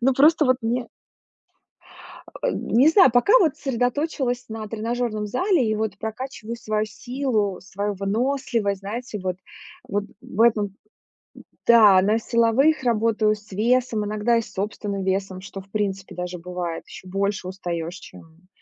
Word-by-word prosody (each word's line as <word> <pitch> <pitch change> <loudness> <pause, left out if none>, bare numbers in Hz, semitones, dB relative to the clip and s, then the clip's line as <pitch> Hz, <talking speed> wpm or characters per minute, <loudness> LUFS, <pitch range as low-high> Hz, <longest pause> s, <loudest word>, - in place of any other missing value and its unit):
Ну, 260 +2 +3
просто 305 +4 +5
вот 255 0 +4
мне 235 +1 -1 1.6
А, - - +2
не 255 +7 +3
знаю. 325 - +6
Пока 245 - +4
вот 320 -7 +2
сосредоточилась 250 0 -1
на 220 -1 -6
тренажёрном 225 -1 -2
зале 260 - +1
и 215 - +1
вот 220 0 -3
прокачиваю 230 0 -6
свою 215 -1 -1
силу, 225 -3 -2
свою 200 +1 -3
выносливость, 210 0 -1
знаете 215 +1 -5
вот, 185 -1 -2 0.5
вот 205 0 -1 0.2
в 210 - -6
этом. 220 -3 +4 1.0
Н-да, 210 -5 +8
на 215 +4 +2
силовых 235 +7 +2
работаю 220 -2 +2
с 210 -1 -18
весом, 230 +1 +1
иногда 215 +3 +1
и 230 - -1
с - - -13
собственным 200 0 -3
весом, 190 0 -1
что, 195 +1 -8
в 195 - -17
принципе, 195 -2 -3
даже 180 0 -4
бывает, 175 -1 -5
ещё 185 - -11
больше 195 0 -1
устаешь, 175 -2 -4
чем, 165 +3 -16
215 Hz, 145 wpm, -23 LUFS, 195-245 Hz, 1.6 s, Н-да